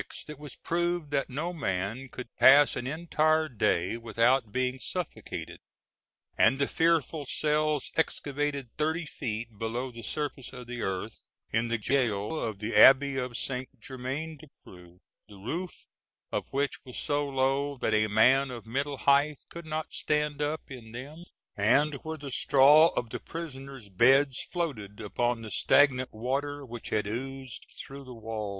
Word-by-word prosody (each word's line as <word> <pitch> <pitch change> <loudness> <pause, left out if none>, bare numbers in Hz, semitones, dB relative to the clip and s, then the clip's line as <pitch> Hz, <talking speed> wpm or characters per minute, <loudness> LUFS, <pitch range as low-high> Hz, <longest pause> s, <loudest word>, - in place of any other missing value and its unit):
it 150 -2 -9
was 150 -3 -9
proved 175 -2 -1
that 140 -1 0
no 155 +7 -3
man 115 - -3
could 125 -2 -9
pass 140 +2 +7
an 125 - -4
entire 155 +1 +1
day 105 - 0
without 115 +1 +2
being 130 +1 -1
suffocated; 110 - -5 0.8
and 130 +4 +4
the 140 - +1
fearful 165 -2 +1
cells 150 +1 0
excavated 145 -4 -1
thirty 160 +2 0
feet 115 -6 -5
below 120 +3 -3
the 115 -1 -9
surface 140 +1 -4
of 125 -1 -8
the 120 0 -6
earth, 95 +3 -4 0.3
in 115 +1 +2
the 120 0 0
gaol 115 +2 0
of 110 -3 -3
the 105 +2 -4
Abbey 135 +5 +7
of 125 -3 -3
Saint 130 +3 -3
Germain 135 +7 -5
des 155 +2 -14 0.2
Prés, 90 -1 -14 0.3
the 105 - -14
roof 160 - -5 0.5
of - - -2
which 140 +1 -2
was 125 -2 -9
so 145 0 0
low 135 +1 0
that 110 - 0
a 110 0 +3
man 130 +6 +4
of 120 -3 -8
middle 140 +5 -2
height 140 +2 +2
could 170 -1 -9
not 155 0 -4
stand 150 -1 -1
up 150 +2 -1
in 115 -4 -10
them, 145 +8 -8 0.3
and 145 +9 +3
where 160 0 -5
the 140 -2 -8
straw 145 +5 +6
of 115 -2 -2
the - - -4
prisoners' 135 -8 -8
beds 130 +7 +4
floated 120 - -3
upon 115 +2 -1
the 110 - -7
stagnant 130 -3 +3
water 140 +5 -3
which 120 -2 -7
had 105 -1 0
oozed 130 +3 -5
through 140 +1 -9
the 130 -2 -10
walls. 110 -2 -5
135 Hz, 160 wpm, -29 LUFS, 115-150 Hz, 0.8 s, pass